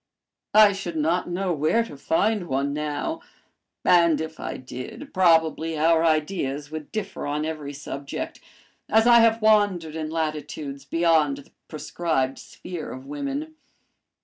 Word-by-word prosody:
I 215 Hz, -1 st, +8 dB
should 185 Hz, -4 st, -5 dB
not 165 Hz, +4 st, 0 dB
know 180 Hz, +1 st, -1 dB
where 155 Hz, +10 st, +2 dB
to 230 Hz, -, -10 dB
find 190 Hz, +7 st, 0 dB
one 140 Hz, 0 st, -1 dB
now, 150 Hz, -, -3 dB, 0.6 s
and 170 Hz, -3 st, +5 dB
if 160 Hz, 0 st, -6 dB
I -, -, -4 dB
did, 130 Hz, -, -9 dB
probably 165 Hz, -3 st, +3 dB
our 165 Hz, +1 st, +4 dB
ideas 150 Hz, -3 st, 0 dB
would 155 Hz, -1 st, -7 dB
differ 200 Hz, -7 st, -4 dB
on 150 Hz, +1 st, -1 dB
every 155 Hz, -3 st, -5 dB
subject, 140 Hz, -1 st, -6 dB, 0.5 s
as 220 Hz, +1 st, +4 dB
I 240 Hz, -1 st, +8 dB
have 225 Hz, -1 st, +4 dB
wandered 200 Hz, -7 st, +3 dB
in 155 Hz, -1 st, -3 dB
latitudes 150 Hz, -3 st, -4 dB
beyond 165 Hz, -4 st, +2 dB
the 140 Hz, -, -14 dB, 0.2 s
prescribed 155 Hz, -4 st, -2 dB
sphere 175 Hz, -4 st, -8 dB
of 260 Hz, +2 st, -9 dB
women. 290 Hz, +2 st, -4 dB
160 Hz, 140 wpm, -24 LUFS, 150-195 Hz, 0.6 s, I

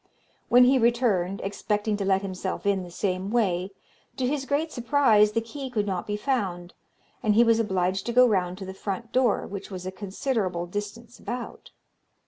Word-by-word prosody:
When 245 Hz, +1 st, +7 dB
he 260 Hz, +1 st, +5 dB
returned, 225 Hz, -6 st, +1 dB
expecting 210 Hz, +1 st, -1 dB
to 200 Hz, -, -2 dB
let 190 Hz, 0 st, +2 dB
himself 190 Hz, 0 st, -4 dB
in 200 Hz, -1 st, +2 dB
the 180 Hz, -, -8 dB
same 185 Hz, +1 st, -2 dB
way, 190 Hz, -5 st, +1 dB, 0.5 s
to 260 Hz, -, 0 dB
his 270 Hz, +1 st, -1 dB
great 305 Hz, +3 st, 0 dB
surprise 230 Hz, -5 st, +3 dB
the 230 Hz, -, +1 dB
key 265 Hz, +4 st, -7 dB
could 215 Hz, -5 st, -1 dB
not 190 Hz, -3 st, -3 dB
be 210 Hz, 0 st, -2 dB
found, 195 Hz, -8 st, -2 dB, 0.5 s
and 215 Hz, -3 st, +2 dB
he 235 Hz, -, +7 dB
was 230 Hz, -1 st, +3 dB
obliged 190 Hz, -2 st, 0 dB
to -, -, 0 dB
go 250 Hz, +1 st, +7 dB
round 185 Hz, -4 st, 0 dB
to 190 Hz, -, -7 dB
the 190 Hz, -, -7 dB
front 200 Hz, +4 st, -5 dB
door, 250 Hz, -4 st, +2 dB
which 200 Hz, 0 st, -7 dB
was 185 Hz, -2 st, -7 dB
a 185 Hz, -, -3 dB
considerable 190 Hz, -2 st, -2 dB
distance 210 Hz, +5 st, -7 dB
about. 245 Hz, 0 st, -6 dB
210 Hz, 185 wpm, -26 LUFS, 190-240 Hz, 0.5 s, When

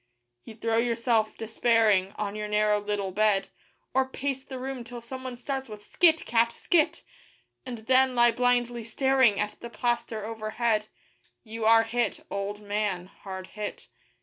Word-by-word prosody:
You 220 Hz, -, -11 dB
throw 225 Hz, 0 st, 0 dB
yourself, 230 Hz, -2 st, +1 dB
despairing, 220 Hz, -4 st, +2 dB
on 205 Hz, -1 st, -3 dB
your 210 Hz, 0 st, -3 dB
narrow 210 Hz, 0 st, +2 dB
little 205 Hz, -2 st, -2 dB
bed, 205 Hz, 0 st, +2 dB, 0.4 s
Or 260 Hz, 0 st, +2 dB
pace 270 Hz, 0 st, -3 dB
the 265 Hz, -, -8 dB
room 260 Hz, -1 st, -5 dB
till 240 Hz, +1 st, -8 dB
someone 255 Hz, +2 st, -7 dB
starts 265 Hz, +1 st, -4 dB
with 210 Hz, -1 st, -10 dB
'Skit! 325 Hz, +6 st, +3 dB
cat! 230 Hz, 0 st, +2 dB
skit!' 335 Hz, +2 st, +1 dB, 0.6 s
And 245 Hz, -2 st, -5 dB
then 260 Hz, 0 st, +4 dB
lie 240 Hz, 0 st, +6 dB
blindly 245 Hz, 0 st, +1 dB
staring 260 Hz, -1 st, +3 dB
at 210 Hz, 0 st, -2 dB
the 235 Hz, -, -8 dB
plaster 235 Hz, -3 st, -2 dB
overhead 220 Hz, 0 st, -1 dB, 0.6 s
You 225 Hz, -1 st, -5 dB
are 225 Hz, 0 st, +7 dB
hit, 230 Hz, -1 st, -1 dB
old 200 Hz, +1 st, -3 dB
man 205 Hz, -3 st, -1 dB, 0.2 s
hard 190 Hz, -1 st, -7 dB
hit. 210 Hz, -1 st, -6 dB
230 Hz, 150 wpm, -27 LUFS, 210-245 Hz, 0.6 s, are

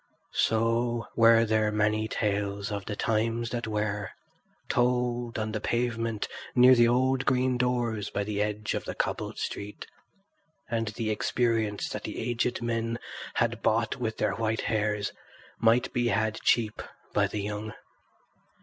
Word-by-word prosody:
So 115 Hz, +1 st, +1 dB
were 115 Hz, 0 st, +6 dB
there 110 Hz, -1 st, +2 dB
many 105 Hz, +1 st, +1 dB
tales 100 Hz, -1 st, -1 dB
of 100 Hz, -2 st, -4 dB
the 105 Hz, -, -4 dB
times 115 Hz, +2 st, 0 dB
that 120 Hz, -2 st, -3 dB
were, 105 Hz, -1 st, -2 dB, 0.6 s
told 120 Hz, -1 st, +1 dB
on 110 Hz, 0 st, -2 dB
the 110 Hz, -1 st, -3 dB
pavement 115 Hz, -2 st, -1 dB, 0.3 s
near 125 Hz, +1 st, +8 dB
the 120 Hz, -1 st, +6 dB
old 130 Hz, +2 st, +2 dB
green 130 Hz, -1 st, +2 dB
doors 120 Hz, -4 st, 0 dB
by 100 Hz, -, -2 dB
the 105 Hz, 0 st, -2 dB
edge 105 Hz, 0 st, -1 dB
of -, -, -3 dB
the -, -, -5 dB
cobbled -, -, -2 dB
street, 105 Hz, +1 st, -5 dB, 0.8 s
and 115 Hz, -1 st, -1 dB
the 110 Hz, +1 st, -2 dB
experience 110 Hz, -1 st, 0 dB
that -, -, -4 dB
the -, -, -5 dB
aged 120 Hz, +1 st, -1 dB
men 115 Hz, 0 st, -1 dB, 0.4 s
had -, -, 0 dB
bought -, -, +1 dB
with -, -, -3 dB
their -, -, +1 dB
white 110 Hz, 0 st, -1 dB
hairs 105 Hz, -2 st, 0 dB, 0.5 s
might 115 Hz, +2 st, +3 dB
be 120 Hz, -1 st, +1 dB
had 110 Hz, 0 st, 0 dB
cheap 110 Hz, -3 st, +2 dB, 0.3 s
by -, -, +3 dB
the 105 Hz, -, -3 dB
young. 105 Hz, +1 st, -4 dB
115 Hz, 150 wpm, -28 LUFS, 105-120 Hz, 0.8 s, near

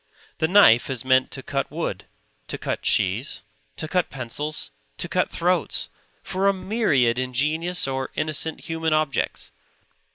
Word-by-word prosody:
The 160 Hz, -, +2 dB
knife 160 Hz, -, +6 dB
is 130 Hz, -2 st, -3 dB
meant 130 Hz, 0 st, +4 dB
to 135 Hz, -, -7 dB
cut 135 Hz, -1 st, -2 dB
wood, 160 Hz, +3 st, -4 dB, 0.4 s
to -, -, -4 dB
cut -, -, -3 dB
cheese, 100 Hz, +8 st, +1 dB, 0.3 s
to 155 Hz, -, -4 dB
cut 180 Hz, +2 st, 0 dB
pencils, 135 Hz, -, -3 dB, 0.3 s
to -, -, -2 dB
cut -, -, +1 dB
throats; -, -, 0 dB, 0.3 s
for 190 Hz, +1 st, 0 dB
a 200 Hz, -, +5 dB
myriad 155 Hz, -, +2 dB
ingenious 150 Hz, +7 st, 0 dB
or 135 Hz, 0 st, -2 dB
innocent 155 Hz, +1 st, 0 dB
human 160 Hz, -1 st, -1 dB
objects. 155 Hz, -2 st, -1 dB
150 Hz, 140 wpm, -24 LUFS, 130-165 Hz, 0.4 s, knife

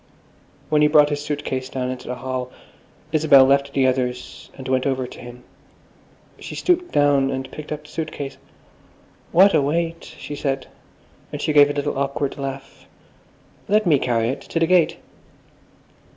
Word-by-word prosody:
When 150 Hz, -1 st, +3 dB
he 150 Hz, -, +6 dB
brought 150 Hz, -1 st, +5 dB
his 145 Hz, 0 st, -2 dB
suit 150 Hz, -1 st, -3 dB
case 130 Hz, 0 st, -3 dB
down 130 Hz, -1 st, -3 dB
into 130 Hz, -1 st, -8 dB
the 125 Hz, -, -3 dB
hall, 125 Hz, 0 st, -4 dB, 0.6 s
Isabel 145 Hz, -4 st, +6 dB
left 140 Hz, +1 st, +2 dB
the 135 Hz, -1 st, +2 dB
others 125 Hz, -1 st, -2 dB
and 130 Hz, -, -8 dB
went 130 Hz, +1 st, +1 dB
over 130 Hz, -1 st, -1 dB
to -, -, -11 dB
him. 120 Hz, 0 st, -11 dB, 1.0 s
She -, -, -8 dB
stooped 360 Hz, 0 st, 0 dB
down 145 Hz, -2 st, +3 dB
and 130 Hz, 0 st, -4 dB
picked 150 Hz, 0 st, -9 dB
up 150 Hz, 0 st, -4 dB
the 150 Hz, -, -16 dB
suit 155 Hz, -1 st, -4 dB
case. 135 Hz, -2 st, -6 dB, 0.9 s
"What 195 Hz, +4 st, +6 dB
a 155 Hz, -, +4 dB
weight!" 165 Hz, +3 st, -1 dB
she 145 Hz, -, -7 dB
said, 135 Hz, -2 st, -2 dB, 0.7 s
and -, -, -5 dB
she 155 Hz, -, -1 dB
gave 145 Hz, -1 st, +7 dB
a -, -, -1 dB
little 145 Hz, -1 st, -2 dB
awkward 140 Hz, 0 st, -2 dB
laugh. 135 Hz, 0 st, -7 dB, 0.8 s
"Let 210 Hz, +1 st, +2 dB
me 150 Hz, -6 st, +4 dB
carry 115 Hz, -3 st, 0 dB
it! 135 Hz, +2 st, -4 dB
To 165 Hz, -, -3 dB
the 165 Hz, -, +3 dB
gate." 175 Hz, -1 st, +3 dB
140 Hz, 175 wpm, -22 LUFS, 130-150 Hz, 1.0 s, gave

